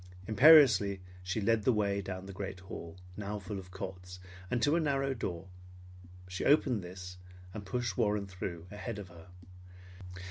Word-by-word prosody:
Imperiously 110 -6 +7 0.2
she 90 +4 -2
led 110 +1 +2
the 130 - +3
way 100 -3 +1
down 95 -1 -6
the 100 - -8
great 95 -1 -6
hall, 85 -2 -8 0.2
now 105 0 -4
full 100 0 -5
of 90 -1 -11
cots, 90 -1 -7 0.3
and 125 - 0
to 145 +7 +3
a - - +3
narrow 135 -3 +1
door. 95 -7 -5 0.8
She 90 +1 -4
opened 130 -8 +3
this 90 0 -9 0.3
and 100 -2 -7
pushed 120 -2 -2
Warren 105 -3 +1
through 90 -3 -6
ahead 105 +2 -5
of 100 -3 -8
her. 85 -1 -14
100 Hz, 165 wpm, -32 LUFS, 90-115 Hz, 0.8 s, Imperiously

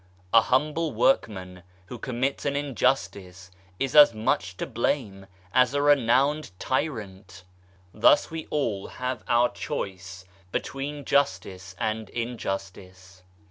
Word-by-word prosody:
A 115 - +8
humble 150 +6 0
workman 95 -6 0 0.2
who 120 +5 -9
commits 130 +3 -2
an 140 -1 -1
injustice 115 -10 -2 0.3
is 135 +1 -2
as 145 -6 +8
much 90 -4 -1
to - - -3
blame 105 -7 -2 0.3
as 125 +1 +3
a 145 - +2
renowned 140 +1 +3
tyrant. 100 - -4 0.5
Thus 110 - +4
we 160 -1 -6
all 115 -10 -2
have 125 -2 -5
our 120 0 +3
choice 95 -8 -6 0.3
between 140 +5 -4
justice 95 -10 -1
and 110 0 -3
injustice. 95 -5 -6
120 Hz, 115 wpm, -26 LUFS, 95-140 Hz, 0.5 s, A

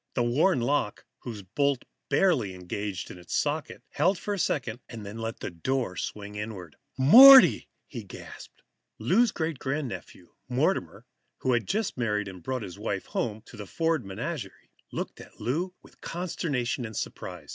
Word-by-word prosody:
The 120 - +2
worn 130 +5 +2
lock, 120 -4 0
whose 110 -5 -7
bolt 140 +7 0 0.2
barely 135 - +2
engaged 90 0 -5
its 90 -1 -6
socket, 150 +1 -2
held 180 +6 +2
for 205 - -3
a 200 - -3
second, 125 -8 -1
then 110 -2 -8
let 115 0 -5
the - - -4
door 120 +3 -2
swing 105 +1 -5
inward. 105 -6 -6 0.2
"Morty!" 255 - +9 0.4
gasped - - -11 0.3
Lou. - - +1
Lou's 240 -2 +5
great 160 -4 -3
grandnephew, 130 - -5 0.2
Mortimer, 130 - 0 0.4
who 130 - +2
had 120 -5 0
just 215 - -1
married 105 -3 0
and 95 -2 -9
brought 130 +6 -3
his 90 -4 -8
wife - - -3
home 110 -2 -3
to - - -13
the 105 -3 -8
Ford 165 - 0
menage, 95 -1 -4 0.4
looked - - -5
at - - -15
Lou 175 +9 -2
with - - -20
consternation 145 -8 -2
and 110 -2 -6
surprise. - - -6
120 Hz, 155 wpm, -28 LUFS, 105-155 Hz, 0.4 s, Morty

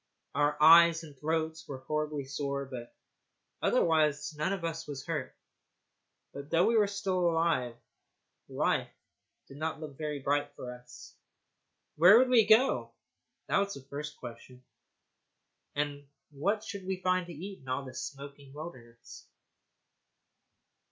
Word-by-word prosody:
Our 145 +1 +1
eyes 165 +1 +7
and 150 -3 -12
throats 160 +2 -2
were 130 -2 -7
horribly 150 -2 -2
sore, 140 0 -3
but 125 -3 -8 0.7
otherwise 150 -2 +2
none 155 +5 -1
of 195 -4 -3
us 165 -1 -4
was 140 -2 -6
hurt. 165 -4 -4 1.0
But 140 +1 -8
though 170 +2 +4
we 230 - +3
were 210 -2 +4 0.2
alive, 165 -9 +1 0.7
life - - 0 0.6
did 135 - -12
not 155 +1 -3
look 150 -3 -9
very 150 -1 -3
bright 145 +1 -1
for 125 0 -7
us. 125 0 -13 0.8
Where 180 +8 +8
should 255 0 +3
we 230 -4 +5
go? 230 +5 +4 0.5
That - - +2
was 200 0 -1
the 140 - -9
first 150 +2 -7
question. 125 +1 -11 1.1
And 145 -1 -3 0.2
what 200 +10 -1
should 200 -3 -7
we 190 -1 -2
find 185 -1 +1
to 175 - -8
eat 190 +6 -8
in 130 - -13
all 135 +2 -2
this 130 -2 -6
smoking 140 0 -9
wilderness? 125 -7 -11
150 Hz, 140 wpm, -30 LUFS, 140-170 Hz, 1.1 s, Where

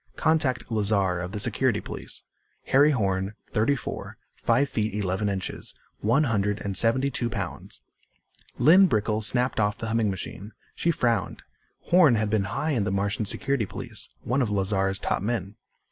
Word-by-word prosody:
Contact 155 -7 +1
Lazar 100 -4 +1
of 90 +1 -5
the 105 - -4
Security - - +1
Police. - - -5 0.4
Harry 145 +3 +5
Horn. 100 -6 0
Thirty 115 +7 +1
four, 125 - -6 0.2
five 120 +5 +2
feet, 110 -4 -2
eleven 100 0 -1
inches, 95 -2 -5 0.2
one 120 +8 +2
hundred 105 -5 0
and 100 -1 -3
seventy 130 +7 +2
two 120 -2 -1
pounds." 100 -8 -6 0.8
Lynn 175 +10 +7
Brickel 110 - 0
snapped 125 +4 +1
off 105 -1 +1
the 110 - -4
humming 110 -2 +1
machine. 100 +2 -6 0.2
She 170 - -1
frowned. 120 -8 0 0.4
Horn 170 -8 +5
had 110 -1 0
been 105 -3 +1
high 150 +9 -2
in 120 -8 +1
the 95 - -1
Martian 100 +2 -1
Security 135 -2 -1
Police, - - -4
one 130 +4 0
of 120 - 0
Lazar's 95 -1 0
top - - -1
men. 105 -2 -2
110 Hz, 160 wpm, -26 LUFS, 100-125 Hz, 0.8 s, Lynn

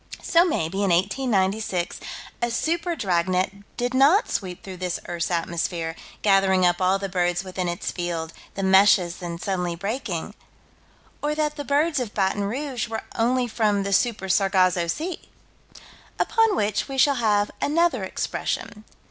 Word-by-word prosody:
So 340 0 +5
maybe, 195 - -1
in 195 - +2
1896, 195 -1 0 0.4
a 240 - +1
super 330 +8 -1
dragnet 185 - 0 0.2
did 245 +1 -1
not 295 - +4
sweep 185 -2 -4
through 190 -2 -8
this 180 -1 -3
earth's 170 -2 -2
atmosphere, 170 -1 -2 0.3
gathering 195 -2 +4
up 175 +1 +2
all 185 +1 +3
the 195 0 -4
birds 175 -1 0
within 185 -1 -4
its 175 0 -3
field, 170 -2 -4 0.2
the 195 - -3
meshes 190 -2 +5
then 170 -2 -5
suddenly 180 -1 -2
breaking 200 -1 -4 0.9
Or 295 +1 -1
that 300 -1 0
the 290 - -5
birds 295 +2 +1
of 235 -4 -4
Baton 200 0 +1
Rouge 255 +2 -3
were 225 -1 -4
only 245 +2 +1
from 215 -3 +1
the 200 0 -2
Super 220 -3 +1
Sargasso 185 -2 +2
Sea 320 - -3 1.0
Upon 450 -3 +2
which 205 - 0
we 270 -1 -5
shall 280 +1 +4
have 210 -2 +2
another 305 - +2
expression. 210 +3 -4
200 Hz, 150 wpm, -24 LUFS, 180-255 Hz, 1.0 s, So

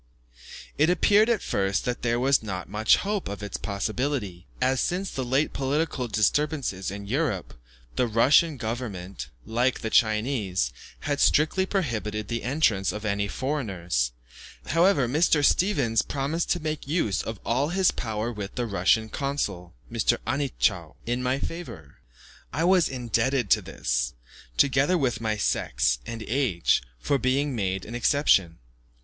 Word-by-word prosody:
It 155 +3 +5
appeared 205 +5 +4
at 230 -4 +1
first 95 0 0
that 125 0 -2
there 120 0 +1
was 135 +2 +3
not 95 -4 -5
much 110 +2 +3
hope 205 0 -2
of 100 +1 -6
its 100 - -4
possibility, 100 0 -3
as, 130 +1 +2
since 185 +2 -1
the 130 - -3
late 135 +5 +1
political 140 -1 -1
disturbances 115 - 0
in 100 +1 -7
Europe, 125 - -1 0.4
the 125 - +2
Russian 140 +7 +4
government, 100 - -5 0.2
like 120 +3 0
the 110 - -3
Chinese, 105 - +1 0.3
had 145 -1 -2
strictly 175 +5 +3
prohibited 110 - -2
the 115 -1 -2
entrance 120 -8 +1
of 105 +1 -6
any 100 -1 0
foreigners; 95 - -2 0.6
however, 165 -4 +3
Mr. 150 +2 +3
Stevens 120 - +2
promised 145 +4 -2
to 175 - +1
make 155 -3 -4
use 140 - 0
of 110 -3 -6
all 130 +6 +1
his 190 +1 +3
power 110 0 -3
with 105 -3 -7
the 120 - -1
Russian 105 +1 +2
consul, 105 - -3 0.2
Mr. 115 +1 +2
Anitschow, 120 - -1
in 120 +1 -1
my 125 +1 0
favour. 120 - -7 0.5
I 155 +6 -1
was 180 -1 +4
indebted 125 -2 0
to - - +5
this, - - -2 0.4
together 140 +5 +3
with 125 -8 -1
my 110 -1 -1
sex - - +1
and 115 -1 -5
age, 115 - +1 0.2
for 140 - 0
being 135 +2 0
made 95 -3 -2
an 115 - -8
exception. 115 - +2
120 Hz, 145 wpm, -26 LUFS, 100-145 Hz, 0.6 s, It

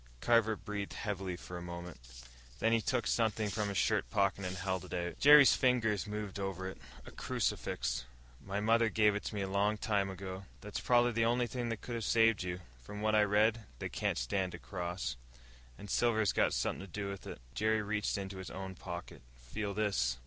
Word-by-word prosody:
Carver 115 - +3
breathed 105 -2 -5
heavily 95 -3 -3
for 90 0 -8
a - - -9
moment. 85 -3 -7 0.6
Then 115 - +2
he 115 - +3
took 125 +1 0
something 110 -2 +1
from 105 +1 -1
his 100 - -2
shirt - - +1
pocket 100 +4 +1
and 90 0 -3
held 95 0 -2
it 90 - -6
out. 85 0 -3
Jerry's 145 -1 +9
fingers 115 -5 +2
moved 105 -2 -4
over 95 -1 -3
it. 95 - -8 0.3
A - - -10
crucifix. 60 - -2 0.4
"My 100 +1 -2
mother 115 +2 +3
give 105 -1 +4
it 105 - -3
to - - -4
me 100 - -1
a - - -2
long 100 +2 +1
time 100 -2 0
ago." 95 0 -6 0.2
"That's 105 0 -5
probably 120 0 +4
the 115 0 +1
only 120 +1 +2
thing 120 +1 -3
that 115 -1 -3
could 120 - -6
have 115 -1 -2
saved 115 0 +4
you. 90 0 -4 0.2
From 105 +13 -8
what 110 0 +2
I 105 - +6
read, 105 +1 +2
they - - -4
can't - - -1
stand 90 +10 -1
a - - -7
cross. 90 -6 -4 0.6
And 105 - -9
silver's 110 0 +2
got - - +2
something - - -1
to 95 - -11
do 100 +1 -3
with 100 -1 -6
it." - - -7
Jerry 110 +5 +1
reached 105 -1 -1
into 95 -1 -5
his 95 -3 -6
own 95 0 -6
pocket. 85 -1 -8 0.3
"Feel 100 -2 -3
this." 95 - +1
100 Hz, 205 wpm, -33 LUFS, 95-110 Hz, 0.6 s, Jerry's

